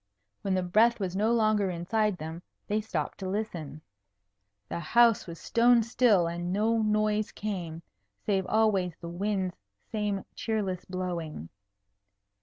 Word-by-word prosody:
When 195 -1 0
the 185 - +1
breath 220 +6 +4
was 190 -2 -2
no 215 +4 +2
longer 215 -4 +3
inside 190 +4 0
them, 160 +2 -6 0.2
they 210 +1 0
stopped 170 -8 -3
to 190 -2 -4
listen. 170 -8 -4 0.8
The - - -4
house 230 +7 +4
was 170 -1 -8
stone 235 0 +4
still, 225 -5 +3
and 175 +1 -3
no 220 +4 +2
noise 215 0 +1
came, 175 -6 -5 0.4
save 190 -3 +1
always 200 -6 +2
the 170 - -7
wind's 190 +1 -1 0.4
same 210 -3 -1
cheerless 205 -5 -2
blowing. 170 - -4
195 Hz, 135 wpm, -29 LUFS, 175-215 Hz, 0.8 s, breath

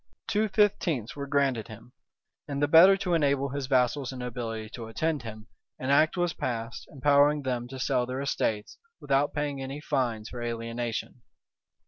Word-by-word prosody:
Two 215 0 +1
fifteenths 185 - +1
were 140 -1 -5
granted 135 -5 +1
him; 110 +2 -12 0.6
and 140 -1 -3
the 145 - +2
better 175 +6 +8
to 180 -2 -1
enable 140 -4 +2
his 140 -1 -4
vassals 130 0 +1
and 130 - -8
nobility 115 -3 -4
to 115 -2 -7
attend 150 +6 -1
him, 110 -2 -9 0.3
an 130 +1 -2
act 155 +5 +4
was 175 -1 +1
passed, 115 -2 -4
empowering 145 +1 +3
them 125 -2 -2
to 135 +1 -8
sell 125 -1 0
their 130 +1 -4
estates, 110 -6 -2 0.2
without 140 +1 +1
paying 145 -2 -3
any 135 +2 -5
fines 125 -7 -1
for 120 - -7
alienation. 115 +1 -4
135 Hz, 165 wpm, -28 LUFS, 120-145 Hz, 0.6 s, better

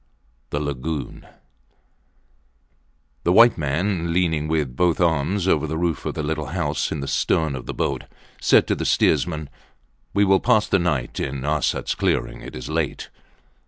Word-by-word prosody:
THE 70 - -2
LAGOON 75 +1 -4 2.0
The 85 - +2
white 115 +5 +7
man, 85 +4 -1
leaning 80 -3 +1
with 75 -6 -1
both 85 +2 +2
arms 85 +3 +1
over 80 -4 +2
the 80 +1 -3
roof 85 -2 -1
of - - -3
the 75 - -3
little 75 -1 -2
house 75 -4 -1
in 75 - -3
the 70 - -4
stern 80 -1 +1
of 65 - -8
the - - -4
boat, - - -2 0.4
said - - +5
to - - +3
the - - -4
steersman 80 -4 +1 0.7
We 100 0 +4
will 95 -1 +4
pass 115 -4 +3
the 95 - +2
night 75 -8 -1
in 70 0 -3
Arsats 75 -2 0
clearing. - - -1
It - - -9
is 65 - -6
late. 80 -2 -3
80 Hz, 160 wpm, -22 LUFS, 75-90 Hz, 2.0 s, white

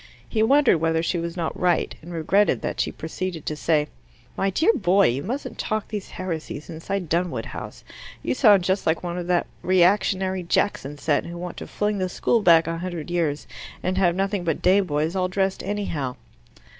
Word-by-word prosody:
He 220 - 0
wondered 260 - +4
whether 160 0 +1
she 170 +1 0
was 170 +1 -4
not 165 -2 -2
right, 180 -1 +1
and 170 +2 -10
regretted 180 +5 +2
that - - -3
she - - 0
proceeded 165 0 -5
to 155 - -2
say, 150 -1 +1 0.5
"My 195 - +1
dear 320 - +3
boy, 195 - +4
you 125 +4 -1
mustn't 250 - -5
talk 215 -1 -2
these 210 -3 -5
heresies 160 -5 -5
inside 175 +3 -4
Dunwood 170 +2 -1
House! - - -8 0.4
You - - 0
sound 210 -8 +5
just 190 +1 0
like 160 +2 +1
one 175 0 -3
of 175 - -5
that 180 -1 +2 0.2
reactionary 185 +1 +2
Jackson 170 -5 0
set, 145 0 0
who 170 0 -7
want 175 0 -6
to - - -7
fling 210 -1 -1
the 185 -1 -1
school 230 +5 +1
back 165 -4 +6
a 165 +1 -3
hundred 175 -2 -5
years 155 -4 0 0.4
and 185 +1 0
have 175 -3 +3
nothing 195 0 -1
but 165 -3 -2
day 185 +2 +5
boys 160 -2 -1
all 185 -1 +1
dressed 190 +1 -1
anyhow." 160 -11 -3
180 Hz, 195 wpm, -24 LUFS, 165-195 Hz, 0.5 s, back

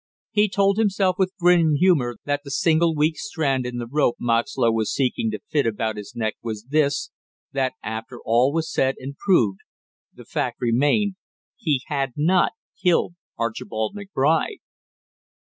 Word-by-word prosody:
He 210 0 +3
told 200 +2 +2
himself 195 -4 +2
with 185 -1 +2
grim 170 -3 +4
humor 145 -8 +3
that 145 0 -1
the 140 - -9
single 160 +3 +2
weak 155 +1 +1
strand 135 -10 -1
in 125 0 -5
the 120 - -3
rope 130 0 +1
Moxlow 115 0 +1
was 110 -1 0
seeking 140 - 0
to - - -4
fit 145 -5 +2
about 110 0 -1
his 105 -1 -9
neck 110 -2 -2
was 110 -2 -5
this, 145 -2 +1 0.4
that 135 -2 0
after 110 +3 -6
all 120 +4 +3
was 160 +1 -2
said 135 0 +2
and 135 +2 -7
proved, 115 - +2 0.5
the - - -14
fact - - -3
remained, 145 - +2 0.4
he 145 -6 -1
had 135 -3 -2
not 175 +5 +3 0.3
killed 175 -1 +2 0.2
Archibald 110 - -3
McBride! 195 - 0
145 Hz, 155 wpm, -23 LUFS, 120-175 Hz, 0.5 s, grim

